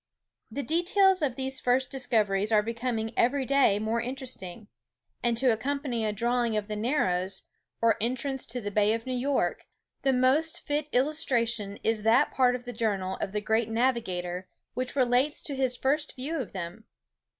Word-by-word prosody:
The 280 - -4
details 370 +4 +3
of 270 -5 0
these 265 0 -2
first 255 +1 +1
discoveries 215 -6 +1
are 210 -1 +4
becoming 230 0 -2
every 265 +2 +2
day 275 -7 +4
more 220 +2 -1
interesting: 235 -6 -6 0.5
and 235 -1 +1
to 255 +1 +4
accompany 260 0 -2
a 215 - +1
drawing 235 +1 0
of 205 -1 -2
the 215 - -3
Narrows, 190 -6 0 0.4
or 230 -1 +4
entrance 260 +3 -2
to 245 +2 -2
the 205 -3 -4
Bay 210 +2 +3
of 230 - -6
New 255 - -3
York, 270 +2 -1 0.3
the 270 - +2
most 275 +6 +3
fit 295 0 -2
illustration 240 -7 +1
is 225 -1 +1
that 225 +3 +4
part 250 -1 +3
of 250 - -6
the 245 - -6
journal 200 -4 -1
of - - -3
the 210 +1 -2
great 220 +1 +1
navigator 190 -7 -1 0.2
which 255 +2 -3
relates 255 +2 +2
to 285 - -3
his 260 -2 0
first 290 +3 0
view 290 +5 -3
of 250 - -5
them. 185 +4 -6
240 Hz, 170 wpm, -28 LUFS, 215-265 Hz, 0.5 s, are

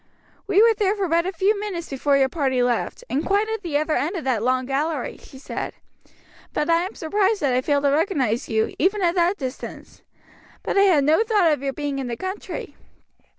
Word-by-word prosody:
"We 405 +1 +5
were 460 0 +6
there 415 -2 +1
for 395 -3 -1
but 335 +1 +1
a - - -1
few 395 +3 +1
minutes 375 -5 -4
before 275 +1 +1
your 270 -1 +3
party 265 -3 0
left; 245 - -1
and 285 +4 -1
quite 405 +2 +1
at 445 -1 -3
the 330 -6 -1
other 310 +1 0
end 330 +7 -1
of 335 - -4
that 255 -5 0
long 255 +2 +1
gallery," 280 +1 -2
she 265 - -14
said. 265 - -5 0.8
"But 300 +2 0
I 335 0 +4
am 400 - -12
surprised 400 +5 0
that 275 -4 +1
I 250 - +2
failed 285 +1 +1
to 280 - +3
recognize 280 - 0
you, 220 -1 0
even 390 +2 +2
at 340 -1 +3
that 355 +2 +2
distance. 260 -2 -7 0.6
But - - -2
I 395 - +5
had 330 -8 +4
no 310 +7 +4
thought 415 -7 +3
of 295 - 0
your 275 -1 -2
being 285 -1 -3
in 265 - -3
the 235 -1 -4
country. 375 +2 -6
315 Hz, 220 wpm, -23 LUFS, 270-390 Hz, 0.8 s, were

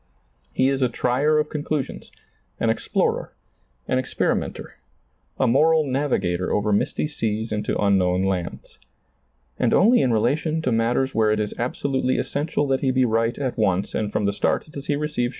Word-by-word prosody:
He 130 - +2
is 135 0 0
a 125 - +3
trier 135 +6 +1
of 150 0 +1
conclu 150 -1 -1
sions, - - -11 0.5
an - - +2
explorer, - - -1 0.5
an 130 - +1
experimenter, 130 - -2 0.6
a 130 - +2
moral 155 +6 +4
navigator 110 -11 -1
over 105 0 +1
misty 100 - 0
seas 110 -7 -3
into 105 -1 -1
unknown 95 -2 +2
lands. 95 -3 -4 0.8
And 120 - +2
only 235 +5 +5
in' 125 - +2
relation 155 +8 0
to 130 - 0
matters 120 +4 +1
where 110 -1 +2
it 105 0 +1
is 105 -1 -2
abso 125 +4 -3
lutely 130 -1 +1
essential 145 0 -1
that 135 -1 +1
he 135 - +1
be 130 0 +2
right 115 0 0
at 130 -4 -3
once 95 -2 +1
and 105 -1 -2
from 105 - -1
the 100 - +1
start 150 - -1
does 140 -1 -8
he 145 - +1
receive 150 -5 -1
125 Hz, 175 wpm, -23 LUFS, 105-145 Hz, 0.8 s, only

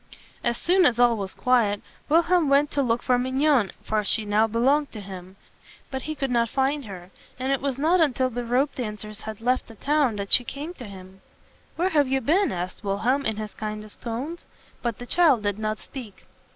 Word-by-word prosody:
As 235 0 0
soon 365 +1 +4
as 240 - +1
all 240 -1 +5
was 195 -3 -4
quiet, 230 -5 +2 0.3
Wilhelm 335 0 +3
went 280 +1 +3
to 285 - +1
look 240 -2 0
for 250 -1 +2
Mignon; 260 -4 +2
for 215 -1 0
she 215 +2 +1
now 210 +2 +3
belonged 270 +6 +2
to 220 - -7
him. 190 -1 -9 0.6
But 265 -1 -3
he 310 +2 -5
could 270 -3 -2
not 235 -1 +2
find 275 +2 0
her, 185 -3 -10 0.3
and 260 +1 -2
it 275 - 0
was 275 -2 -1
not 330 +5 +3
until 260 -4 +2
the 245 +1 -3
ropedancers 230 -4 -2
had 220 0 -7
left 250 +2 0
the 225 - -13
town 285 -1 +1
that 200 -1 -5
she 245 - +8
came 290 +7 -6
to 255 -9 -10
him. 190 -1 -12 0.5
"Where 360 +3 +1
have 295 -6 +3
you 265 +1 +1
been?" 350 - +2
asked 180 0 -5
Wilhelm 235 +8 0
in 220 -1 -2
his 215 -1 -6
kindest 215 -1 -7
tones; 260 +9 -5 0.3
but 235 -3 -2
the 245 - -8
child 290 -6 +4
did 205 0 -1
not 215 0 -2
speak. 235 -6 -10
245 Hz, 205 wpm, -25 LUFS, 215-280 Hz, 0.6 s, she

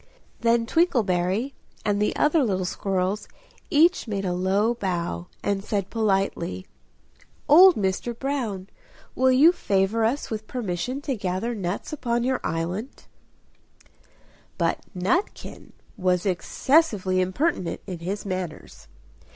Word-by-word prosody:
Then 230 0 +2
Twinkleberry 225 - +1 0.3
and 205 -1 +1
the 210 - +1
other 300 0 +3
little 190 -6 0
squirrels 195 +2 -2 0.4
each 325 -1 +4
made 200 -2 -2
a 180 - 0
low 195 +5 +1
bow, 175 - -3 0.2
and 200 -1 -1
said 200 -2 -2
politely 195 -4 -1 0.8
"Old 355 +5 +8
Mr. 205 +4 -2
Brown, 235 -9 -3 0.5
will 260 0 +3
you 285 +7 +7
favour 205 - 0
us 240 +5 -1
with 215 -1 -4
permission 245 +3 -3
to 285 -2 -2
gather 195 +3 -2
nuts 195 - -4
upon 240 -4 -1
your 260 0 0
island?" 175 - -3 1.5
But - - +1 0.2
Nutkin 215 - -2 0.3
was 180 -1 +1
excessively 195 - +2
impertinent 185 - -1
in 180 -4 -6
his 190 +5 -4
manners. 175 - -6
205 Hz, 120 wpm, -25 LUFS, 185-250 Hz, 1.5 s, Old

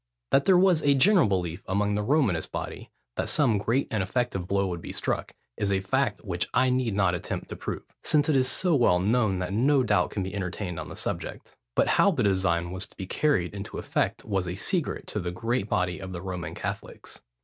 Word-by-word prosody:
That 140 - +4
there 190 -2 +6
was 180 -3 +4
a 140 -1 +4
general 180 - +5
belief 90 -2 -1
among 100 +2 +1
the 105 - 0
Romanist 105 - +1
body, - - -6 0.3
that - - -1
some 125 -9 +3
great 115 +7 0
and 110 - 0
effective 95 -2 -1
blow 100 0 +1
would 90 -3 -4
be - - -7
struck, - - -2 0.2
is 100 - 0
a 95 - +2
fact 110 +3 -1
which 90 -3 -2
I 130 0 +4
need 125 -5 0
not 95 -3 +2
attempt 90 - -4
to - - -5
prove, - - -5 0.2
since 145 -1 +2
it 155 - +2
is 130 -1 +3
so 180 +3 +1
well 120 -10 +4
known, 105 0 +2
that 90 +1 -3
no 135 +5 +3
doubt 90 -6 +2
can 100 - -3
be 95 - -5
entertained 90 -3 -4
on 80 - -6
the - - -8
subject: - - -5 0.2
but - - +3
how - - +4
the 150 -11 0
design 95 -3 +1
was 95 +2 -1
to - - -24
be 95 - -5
carried 95 - +1
into 100 +1 -6
effect - - -1
was 95 -4 -1
a 90 - -3
secret 150 - -1
to 105 - -3
the 90 -2 -3
great 115 +3 -2
body 90 0 0
of 95 -1 -7
the 85 - -5
Roman 90 -2 -5
Catholics. - - -7
100 Hz, 225 wpm, -27 LUFS, 90-130 Hz, 0.3 s, there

